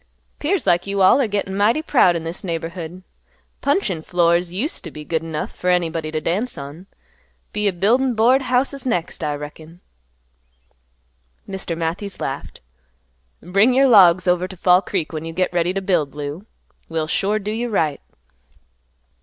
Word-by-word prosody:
"'Pears 335 +2 0
like 175 +2 +2
you 200 -1 +1
all 190 +9 +6
'r 250 - +1
gettin' 200 -2 -2
mighty 220 +9 +2
proud 185 - +4
in 165 - -3
this 165 +2 -5
neighborhood. 170 0 -5 0.6
Puncheon 275 - 0
floors 170 +1 +1
used 235 - -3
t' 170 - -7
be 150 0 -10
good 160 0 -1
enough 160 -2 -4
fer 180 - -2
anybody 165 -3 0
t' 155 - -1
dance 205 +11 -2
on. 145 +7 -9 0.7
Be 210 0 0
a - - +3
buildin' 235 +8 +2
board 245 +5 +4
houses 260 +1 0
next, 180 -10 -2
I 150 -1 -1
reckon." 155 +3 -10 1.7
Mr. 190 -4 -4
Matthews 170 +5 -4
laughed, - - -5 0.8
"Bring 200 +8 +3
your 270 +1 +5
logs 185 -6 +6
over 180 +1 +2
to 185 0 -11
Fall 180 +1 +4
Creek 175 -5 -3
when 155 0 -4
you 165 0 -6
get 185 +1 0
ready 175 0 +1
to 195 +1 -2
build, 165 -8 0
Lou; 150 +7 -6 0.4
we'll 160 -1 -1
sure 195 +6 0
do 210 0 -4
you 235 +2 -2
right." 155 -9 0
180 Hz, 165 wpm, -21 LUFS, 165-210 Hz, 1.7 s, all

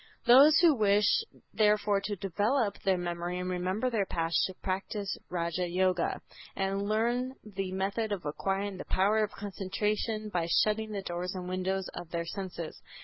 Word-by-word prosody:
Those 275 +6 +8
who 335 -3 +7
wish 210 -3 +3 0.5
therefore 210 -1 +3
to 205 +1 -3
develop 205 +4 0
their 190 -2 +2
memory 175 0 -3
and 180 0 -3
remember 185 +7 -1
their 205 -4 0
past 165 -1 -1
should 190 - -11
practice 195 +1 -2
Raja 175 0 -1
Yoga 185 0 +1 0.3
and 195 0 -1
learn 240 +4 0
the 195 -3 -4
method 200 +4 -1
of 190 -6 -3
acquiring 195 +6 -2
the - - -7
power 210 +3 +2
of 210 - -1
concentration 210 +2 -2
by 175 -4 -1 0.2
shutting 215 0 -1
the 200 -2 -4
doors 180 +1 -4
and 180 -1 -5
windows 185 +1 -1
of 175 - -7
their 170 0 -3
senses. 175 -3 -6
195 Hz, 160 wpm, -30 LUFS, 180-210 Hz, 0.5 s, Those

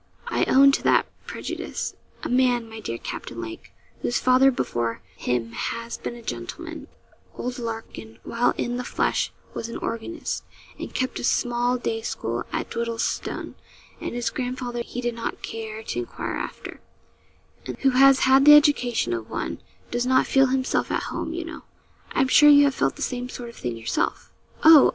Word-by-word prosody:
I - - +1
own 275 +1 +7
to - - 0
that - - +4 0.2
prejudice. - - -4 0.3
A - - -2
man, 245 -2 +2
my 220 0 -9
dear 115 - -4
Captain 115 - -6
Lake, 115 -1 -7 0.3
whose 120 - 0
father 255 +1 +5
before 120 - -2
him 120 -2 -1
has 230 - -4
been 240 - -6
a 235 - -11
gentleman - - -6 0.5
(old 250 +1 -4
Larkin, 225 - -6
while 235 +1 +1
in 240 0 -1
the 250 - -3
flesh, - - 0 0.2
was 230 - -4
an - - -5
organist, 230 +9 -4 0.4
and - - -6
kept 255 0 -2
a - - -6
small 245 +1 +1
day 225 -2 -2
school 120 - -3
at - - -3
Dwiddleston, 230 -1 -2 0.5
and - - -5
his 235 -2 -1
grandfather 245 -1 -3
he 245 +1 -5
did 240 -1 -1
not 230 - -5
care 220 -1 -6
to 120 - -3
enquire 120 - -4
after), - - -6 0.9
and - - -5
who 270 - +4
has 270 +1 +6
had 265 +1 +5
the 295 0 +11
education 250 - +3
of 115 -1 -4
one, - - -3 0.3
does 240 +1 0
not 260 0 +4
feel 270 0 +4
himself 260 0 0
at - - -2
home, - - -3
you 335 0 -4
know 330 - -8 0.5
I'm 265 - +3
sure 295 +3 +7
you 290 0 +8
have 280 -1 +3
felt - - 0
the 295 - -4
same 250 -1 -3
sort 245 -1 -7
of 235 - -13
thing 120 -2 -4
yourself.' 115 0 -2 0.3
'Oh! 315 -3 +9
240 Hz, 180 wpm, -25 LUFS, 225-260 Hz, 0.9 s, the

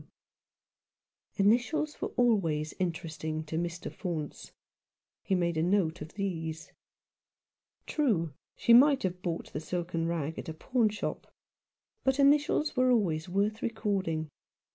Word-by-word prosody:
W." 200 -1 +4
Initials 295 +7 +1
were - - 0
always 170 -11 +2
interesting 160 -3 -3
to 155 +1 -6
Mr. 170 +1 -3
Faunce. 165 -6 -5 0.7
He 190 - 0
made 170 -2 0
a - - +2
note 175 -2 +1
of 155 +2 -8
these. 165 -5 -4 1.1
True, 195 - +1 0.2
she 235 - +4
might 275 +3 +7
have 180 -1 -2
bought 170 -2 -4
the - - -2
silken 170 0 -2
rag 160 -2 -2
at - - -6
a 160 - -5
pawnshop; 220 +2 -1 0.7
but 265 0 +2
initials 290 +2 +3
are 255 0 +4
always 180 -9 +1
worth 205 +4 0
recording. 190 -9 -1
180 Hz, 125 wpm, -30 LUFS, 160-225 Hz, 1.1 s, might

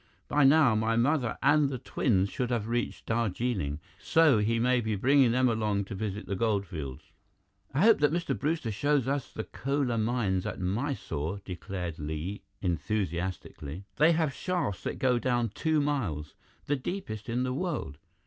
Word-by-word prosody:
By 145 -1 +3
now, 140 -3 +6
my 110 +1 +1
mother 125 +1 +1
and 145 0 +4
the 135 - -3
twins 100 -5 +1
should 125 -2 -2
have 115 -4 -1
reached 120 +1 -2
Darjeeling, 110 - -1 0.2
so 160 -8 +4
he 115 +2 +1
may 125 +1 +3
be 110 -1 -1
bringing 130 +3 +4
them 130 +1 +3
along 105 -3 0
to 100 - -7
visit 105 +1 -4
the 100 - -3
gold 100 -1 +1
fields." 75 -8 -7 0.6
"I 135 - 0
hope 225 +2 +6
that 150 0 +3
Mr. 170 +1 -1
Brewster 150 -6 -1
shows 140 +4 +1
us 140 -1 -1
the 110 - -4
Kolar 135 -3 -1
Mines 110 -4 0
at - - -5
Mysore," 100 - -2
declared 90 -2 -5
Li 80 +6 -4 0.2
enthusiastically. 90 -3 -3
"They 160 +3 +5
have 160 -4 +1
shafts 175 - -2
that - - -2
go 125 -2 +2
down 120 -2 +1
two 155 +8 0
miles, 110 - -1 0.3
the 145 - +1
deepest 125 - -5
in 120 +2 0
the 130 0 -1
world." 145 - -3
115 Hz, 170 wpm, -29 LUFS, 100-140 Hz, 0.6 s, now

